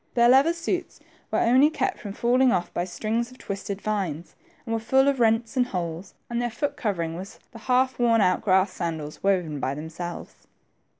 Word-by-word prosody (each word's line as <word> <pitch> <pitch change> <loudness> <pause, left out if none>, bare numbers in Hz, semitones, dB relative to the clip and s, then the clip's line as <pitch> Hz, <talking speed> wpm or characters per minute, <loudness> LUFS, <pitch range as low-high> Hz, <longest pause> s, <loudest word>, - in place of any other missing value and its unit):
Their 235 0 +5
leather 275 +6 +5
suits 345 +1 -3 0.3
were - - 0
only 260 +5 +5
kept 375 +4 -2
from 205 -3 -7
falling 250 +3 +3
off 175 -4 -1
by 175 - -1
strings 225 +5 -2
of 255 - -15
twisted 200 -2 -5
vines, 190 -7 -3 0.3
and 225 -2 -1
wer6 225 - -2
full 265 +4 +3
of 275 -2 +1
rents 225 +1 +2
and 250 -1 +2
holes, 175 -3 -5
and 235 0 -2
their 240 - -1
foot 285 +5 -3
covering 180 - -2
was 190 +3 -8
the 230 - -11
half 255 +3 +1
worn 230 -2 +4
out 185 -3 +3
grass 190 -1 +3
sandals 160 -4 -5
woven 180 -7 0
by 135 +1 -2
themselves. 165 +3 -8
220 Hz, 190 wpm, -25 LUFS, 180-250 Hz, 0.3 s, Their